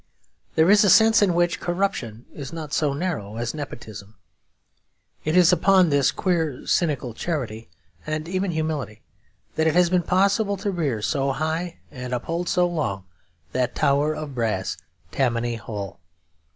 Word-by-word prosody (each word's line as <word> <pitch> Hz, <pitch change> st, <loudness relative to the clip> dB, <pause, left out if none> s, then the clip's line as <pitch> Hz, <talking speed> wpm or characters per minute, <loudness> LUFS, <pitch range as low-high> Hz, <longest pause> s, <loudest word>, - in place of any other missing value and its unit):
There 160 Hz, +4 st, +5 dB
is 205 Hz, 0 st, +6 dB
a 205 Hz, -, +4 dB
sense 225 Hz, +2 st, +6 dB
in 185 Hz, -4 st, +3 dB
which 175 Hz, 0 st, +1 dB
corruption 175 Hz, -, -2 dB
is 140 Hz, -2 st, -7 dB
not 160 Hz, -3 st, -7 dB
so 150 Hz, -3 st, +1 dB
narrow 140 Hz, -, -3 dB
as 120 Hz, 0 st, -2 dB
nepotism. 110 Hz, -8 st, -8 dB, 1.1 s
It 155 Hz, +3 st, +1 dB
is 180 Hz, 0 st, +6 dB
upon 185 Hz, 0 st, +4 dB
this 140 Hz, -3 st, +3 dB
queer 165 Hz, -7 st, -1 dB
cynical 140 Hz, -8 st, 0 dB
charity, 115 Hz, -7 st, -4 dB, 0.4 s
and 155 Hz, +1 st, -3 dB
even 185 Hz, +2 st, -1 dB
humility, 155 Hz, -, -3 dB, 0.5 s
that 160 Hz, 0 st, +3 dB
it 160 Hz, -, +1 dB
has 180 Hz, -1 st, +4 dB
been 180 Hz, -1 st, +3 dB
possible 200 Hz, +3 st, +2 dB
to 200 Hz, +1 st, -2 dB
rear 140 Hz, -, -2 dB
so 135 Hz, +3 st, 0 dB
high 160 Hz, +4 st, -2 dB
and 125 Hz, -2 st, -4 dB
uphold 165 Hz, +8 st, -3 dB
so 180 Hz, -2 st, +3 dB
long 100 Hz, -, -3 dB, 0.5 s
that 125 Hz, -1 st, -1 dB
tower 145 Hz, +2 st, +2 dB
of 150 Hz, -2 st, -6 dB
brass, 110 Hz, -6 st, -1 dB, 0.4 s
Tammany 120 Hz, -3 st, 0 dB
Hall. 105 Hz, -4 st, -7 dB
155 Hz, 150 wpm, -24 LUFS, 125-175 Hz, 1.1 s, is